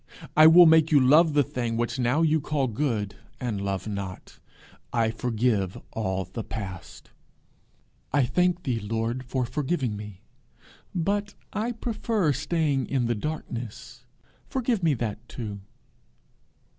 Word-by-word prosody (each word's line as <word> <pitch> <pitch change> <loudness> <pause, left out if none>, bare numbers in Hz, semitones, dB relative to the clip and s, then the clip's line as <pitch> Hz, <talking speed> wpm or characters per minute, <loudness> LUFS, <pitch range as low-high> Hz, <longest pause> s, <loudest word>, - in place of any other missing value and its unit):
I 155 0 +9
will 175 +2 +9
make 160 -1 +5
you 145 - +7
love 150 +5 +5
the 145 -1 +4
thing 120 -2 -3
which 120 +3 -1
now 125 +6 +2
you 160 -1 +3
call 145 -1 0
good 110 -5 -2 0.2
and 110 -6 -2
love 100 +1 -3
not. 100 -3 -6 0.5
I 115 -2 +1
forgive 110 -5 0
all 95 -3 -2
the 110 +5 -6
past.' 95 -5 -8 1.0
'I 140 -1 +3
thank 180 +6 +1
thee, 125 -4 -1
Lord, 115 +4 -2
for 130 0 -2
forgiving 135 -3 -1
me, 105 -2 -9 0.7
but 200 +4 -1 0.2
I 220 +4 -1
prefer 220 -7 0
staying 145 -1 0
in 130 -3 0
the 120 - +1
darkness: 120 -3 -6 0.5
forgive 245 -5 0
me 160 -4 +3
that 115 -1 -5
too.' 105 -4 -6
125 Hz, 135 wpm, -26 LUFS, 110-160 Hz, 1.0 s, I